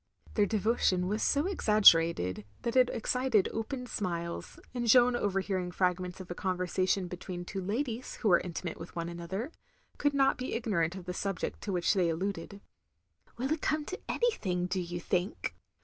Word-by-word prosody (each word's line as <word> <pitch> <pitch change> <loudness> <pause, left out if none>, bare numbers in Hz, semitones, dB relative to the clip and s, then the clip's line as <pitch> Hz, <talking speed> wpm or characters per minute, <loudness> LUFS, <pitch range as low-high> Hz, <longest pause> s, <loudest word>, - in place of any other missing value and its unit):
Their 205 -2 +3
devotion 210 -4 +2
was 210 +3 -1
so 285 +2 +2
exaggerated 170 - +4 0.2
that 235 +1 -2
it 255 -1 +6
excited 240 -2 +1
open 250 +3 -3
smiles, 170 -7 -4
and 240 -2 -2
Jeanne 245 +1 +6
overhearing 195 -4 -1
fragments 180 0 -1
of 185 -1 -8
a - - -1
conversation 185 +1 0
between 175 0 -6
two 195 +2 -4
ladies 230 +5 -3
who 220 - 0
were 175 - +6
intimate 175 0 -5
with - - -9
one 170 0 -3
another, 180 - -4 0.5
could 290 -1 +2
not 270 -1 +3
be 255 - -3
ignorant 190 -8 0
of 185 -2 -8
the 180 - -4
subject 195 0 -3
to 205 - -3
which 180 +1 +2
they 180 -4 +2
alluded. 190 +3 -3 0.8
"Will 260 +4 -2
it 315 - -4
come 310 -1 0
to 380 - -5
anything, 190 - 0
do 185 +1 -1
you 175 0 -4
think? 180 +2 -1
195 Hz, 170 wpm, -31 LUFS, 180-240 Hz, 0.8 s, it